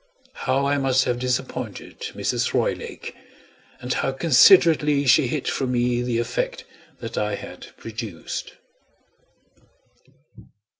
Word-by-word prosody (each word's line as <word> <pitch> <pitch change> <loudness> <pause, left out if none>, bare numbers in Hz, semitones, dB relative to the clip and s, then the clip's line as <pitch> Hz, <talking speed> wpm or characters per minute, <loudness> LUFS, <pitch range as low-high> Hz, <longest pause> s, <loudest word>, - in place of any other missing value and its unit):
How 135 +1 0
I 145 0 +1
must 130 -1 +2
have 125 -1 -1
disappointed 125 -1 -4 0.2
Mrs. - - -1
Roylake! - - -3 0.7
and 125 0 -2
how 135 - 0
considerately 150 0 +5
she 130 0 +5
hid 140 +2 -3
from 130 -2 -1
me 120 0 +1
the 120 -1 -1
effect 115 0 -2 0.4
that - - -4
I 105 -1 -1
had - - -10
produced! 110 -6 -6
125 Hz, 110 wpm, -23 LUFS, 120-140 Hz, 0.7 s, considerately